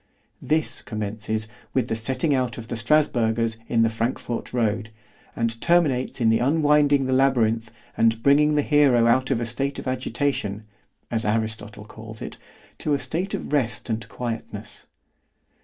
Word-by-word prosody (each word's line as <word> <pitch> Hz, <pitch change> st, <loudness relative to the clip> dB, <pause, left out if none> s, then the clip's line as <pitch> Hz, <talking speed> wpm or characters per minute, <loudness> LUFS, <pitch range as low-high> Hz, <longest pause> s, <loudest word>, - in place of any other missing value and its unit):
This 155 Hz, 0 st, 0 dB
commences 110 Hz, 0 st, -3 dB, 0.3 s
with 130 Hz, -3 st, +2 dB
the 110 Hz, -, -1 dB
setting 130 Hz, +7 st, 0 dB
out 125 Hz, -3 st, 0 dB
of 115 Hz, -1 st, -8 dB
the -, -, -2 dB
Strasburgers 115 Hz, -3 st, +1 dB
in 115 Hz, -1 st, +3 dB
the 115 Hz, -, +3 dB
Frankfort 115 Hz, +1 st, -3 dB
road, 115 Hz, -2 st, 0 dB, 0.5 s
and 115 Hz, 0 st, -1 dB
terminates 150 Hz, -8 st, +2 dB
in 115 Hz, -2 st, +4 dB
unwinding 145 Hz, +2 st, +3 dB
the 130 Hz, -, 0 dB
labyrinth 115 Hz, -4 st, +2 dB, 0.2 s
and 115 Hz, 0 st, +2 dB
bringing 150 Hz, +2 st, +4 dB
the 145 Hz, -, +2 dB
hero 140 Hz, -6 st, +4 dB
out 130 Hz, +3 st, +3 dB
of -, -, +1 dB
a 120 Hz, -, -2 dB
state 135 Hz, +4 st, -2 dB
of -, -, -6 dB
agitation 130 Hz, -5 st, -2 dB, 0.5 s
(as 115 Hz, -1 st, 0 dB
Aristotle 110 Hz, -1 st, -2 dB
calls 110 Hz, 0 st, -10 dB
it) -, -, -7 dB, 0.4 s
to 150 Hz, -, +1 dB
a -, -, +1 dB
state 180 Hz, +7 st, -2 dB
of -, -, -6 dB
rest 125 Hz, -4 st, 0 dB
and 110 Hz, 0 st, -3 dB
quietness. 115 Hz, -2 st, -6 dB
120 Hz, 155 wpm, -24 LUFS, 110-140 Hz, 0.5 s, in